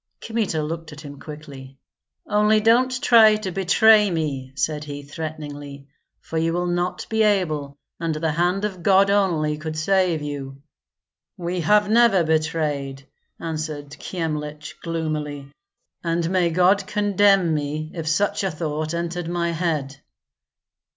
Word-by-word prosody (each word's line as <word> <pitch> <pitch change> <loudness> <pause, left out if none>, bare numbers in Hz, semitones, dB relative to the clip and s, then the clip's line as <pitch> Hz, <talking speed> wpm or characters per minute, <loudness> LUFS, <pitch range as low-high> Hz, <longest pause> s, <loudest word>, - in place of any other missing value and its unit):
Kmita 215 -9 -2
looked 165 +1 -5
at 150 0 -10
him 145 -2 -10
quickly. 140 -3 -10 0.5
"Only 210 +1 +3
don't 255 +4 +2
try 220 -2 +7
to 210 -3 -4
betray 210 +3 +5
me!" 145 -6 -3
said 150 +1 -1
he, 145 -1 -7
threateningly, 145 -2 -7 0.3
"for 160 - -3
you 165 +1 0
will 175 +1 -1
not 175 +1 -2
be 220 0 0
able, 155 -9 +1 0.2
and 165 -2 -1
the 160 +1 -1
hand 180 +5 0
of 190 -4 -5
God 195 +1 +4
only 160 -7 +1
could 155 0 -5
save 175 -1 +1
you." 140 -2 -6 0.8
"We 175 +1 -3
have 205 +5 +4
never 220 -4 +4
betrayed," 150 -4 -1 0.3
answered 155 -3 -5
Kyemlich, 150 -3 -4
gloomily, 150 -4 -4 0.5
"and 170 0 0
may 180 -2 +2
God 185 +4 +3
condemn 200 -4 +3
me 155 +1 -3
if 165 -3 -5
such 200 +6 +1
a 195 - +1
thought 155 0 -3
entered 170 0 -3
my 170 -1 -1
head." 155 -5 -2
165 Hz, 135 wpm, -23 LUFS, 150-190 Hz, 0.8 s, try